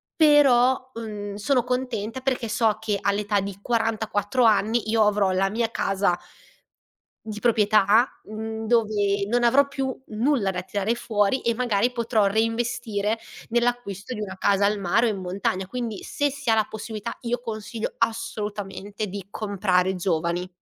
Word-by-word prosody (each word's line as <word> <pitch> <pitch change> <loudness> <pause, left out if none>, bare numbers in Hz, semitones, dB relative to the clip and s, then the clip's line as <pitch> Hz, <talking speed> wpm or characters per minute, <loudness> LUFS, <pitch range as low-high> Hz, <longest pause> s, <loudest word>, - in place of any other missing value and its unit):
Però, 260 -5 +4
n 205 -2 -6
sono 250 +3 +1
contenta 250 -1 -2
perché 255 -3 -1
so 220 -1 +2
che 215 -2 -1
all'età 205 0 +1
di 200 0 -6
44 225 0 0
anni 220 +1 +2
io 220 -1 +4
avrò 205 -2 +2
la 190 +1 +1
mia 225 +2 -1
casa 195 -4 +1 1.1
di 215 -1 -5
proprietà, 215 0 +4 0.2
mhmm, 220 +1 -5
dove 205 -3 +1
non 240 +2 +2
avrò 275 +4 +5
più 270 -2 -2
nulla 225 -1 +1
da 180 -1 -3
tirare 200 +4 -1
fuori 220 +1 0
e 235 - +2
magari 240 -1 +1
potrò 230 -3 +1
reinvestire 225 0 0 0.3
nell'acquisto 240 -2 -1
di 215 - -6
una 190 -2 -6
casa 200 +1 +2
al 205 +1 +2
mare 225 +6 +2
o - - +1
in 195 - -4
montagna. 185 +1 -2
Quindi 230 -1 -4
se 290 0 -1
si 280 -2 -8
ha 225 - +6
la 220 -1 +2
possibilità 220 +1 -6
io 240 +1 -1
consiglio 220 0 -4
assolutamente 210 -2 -3
di 195 -1 -7
comprare 190 -3 0
giovani. 175 0 -1
215 Hz, 150 wpm, -24 LUFS, 200-240 Hz, 1.1 s, ha